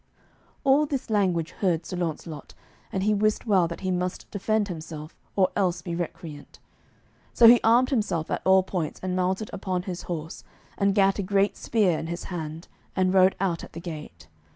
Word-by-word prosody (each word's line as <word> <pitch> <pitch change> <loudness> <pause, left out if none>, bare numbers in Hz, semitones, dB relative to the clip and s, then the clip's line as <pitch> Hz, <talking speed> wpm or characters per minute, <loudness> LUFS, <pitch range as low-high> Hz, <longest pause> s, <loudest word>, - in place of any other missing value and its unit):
All 285 +2 +4
this 270 -5 -3
language 180 -6 +1
heard 175 -4 0
Sir - - -5
Launcelot, 160 -3 -5 0.4
and 190 - -1
he 210 +1 +3
wist 215 +2 +1
well 190 -6 +3
that 170 - -7
he 185 -1 -1
must 180 0 -2
defend 215 +1 0
himself, 155 -3 -7 0.2
or 190 -2 +4
else 185 -3 0
be 170 - -4
recreant. 165 -3 -6 0.8
So 235 - +8
he 240 +1 +9
armed 240 +4 +4
himself 205 - -1
at - - -1
all 190 0 +5
points, 180 -5 -3
and 185 -1 -1
mounted 185 +3 -1
upon 185 -2 -2
his 180 -2 -5
horse, 165 -1 -5 0.3
and 200 -1 +1
gat 195 -1 +3
a - - +2
great 200 +1 +1
spear 195 -8 +1
in 160 - -5
his 170 +1 -5
hand, 160 0 -6 0.3
and 185 -1 +2
rode 190 0 +5
out 180 -4 -1
at - - -11
the 165 - -6
gate. 150 - -8
185 Hz, 185 wpm, -26 LUFS, 170-200 Hz, 0.8 s, he